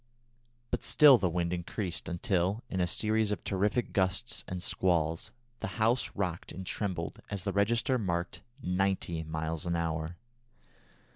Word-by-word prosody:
But - - -1
still 140 -5 +8
the 90 - +1
wind 85 0 -1
increased 90 +1 -3
until, 95 +2 0
in 95 - 0
a 90 - +2
series 110 +3 +1
of 105 - -3
terrific 105 +5 0
gusts 95 +5 0
and 90 -1 -3
squalls, 85 +3 +1 0.3
the - - -5
house 115 +3 +2
rocked 90 -4 -2
and 95 - -7
trembled 90 -4 -3
as 100 -3 -3
the 100 -1 -1
register 115 +6 +2
marked 85 -4 -2 0.2
ninety 90 -2 0
miles 80 +1 -3
an 85 - +1
hour. 85 0 -2
95 Hz, 145 wpm, -31 LUFS, 85-105 Hz, 0.3 s, still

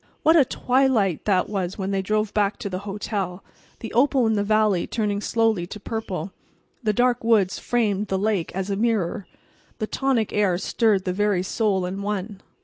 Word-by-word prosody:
What 320 +2 +5
a 310 - +7
twilight 250 - +1
that 185 -3 +2
was 190 -3 -3
when 195 -1 -3
they 195 -1 0
drove 215 +2 -1
back 205 -1 +1
to 200 - -5
the 185 - -3
hotel! 195 -2 -4 0.4
The 225 - -6
opal 260 0 +3
of 220 - +2
the 205 -1 +1
valley 215 -3 +2
turned 210 -2 -1
slowly 225 -6 +1
to 210 - -8
purple, 195 -5 -4 0.5
the 215 -3 +1
dark 245 +2 +1
woods 215 -5 +2
framed 210 -4 0
the 190 - -1
lake 200 -3 0
as 190 +1 -2
a - - 0
mirror, 205 -4 -1 0.5
the 215 - -2
tonic 250 -2 0
air 200 -4 +2
stirred 200 0 +1
the 180 - -1
very 205 -2 +1
soul 195 -2 0
in 190 +2 -4
one. 200 0 -4
205 Hz, 185 wpm, -23 LUFS, 190-225 Hz, 0.5 s, a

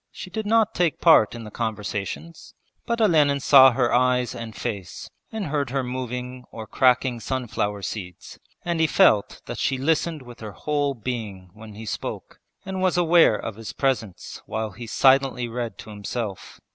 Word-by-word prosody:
She 185 - -9
did 215 +2 -4
not 225 0 +3
take 175 -4 0
part 160 -10 +5
in 115 - -7
the 105 - -9
conversations, 110 - -5 0.3
but 235 0 -1
Olenin 150 -9 +3
saw 135 -1 +8
her 120 -1 0
eyes 125 0 +2
and 115 -2 -7
face 100 -6 -6 0.2
and 220 -3 -4
heard 145 -3 -1
her 135 +1 -1
moving 125 0 -5
or 110 - -8
cracking 125 +1 +2
sunflower 110 -5 -3
seeds, 90 -5 -7 0.3
and 170 -1 -1
he 160 - +4
felt 130 - +3
that - - -6
she 135 - 0
listened 160 +2 0
with 120 -1 -13
her 110 -2 -8
whole 145 +1 -1
being 105 -6 -6
when 110 0 -12
he 110 +1 -9
spoke, - - -6 0.3
and 190 -1 -4
was 185 -1 +2
aware 170 -8 +5
of 105 0 -6
his 115 -2 -7
presence 115 -9 -2
while 110 +1 -3
he 115 +4 -9
silently 130 0 +3
read 120 0 -5
to 110 - -10
himself. 105 0 -6
125 Hz, 170 wpm, -24 LUFS, 110-150 Hz, 0.3 s, saw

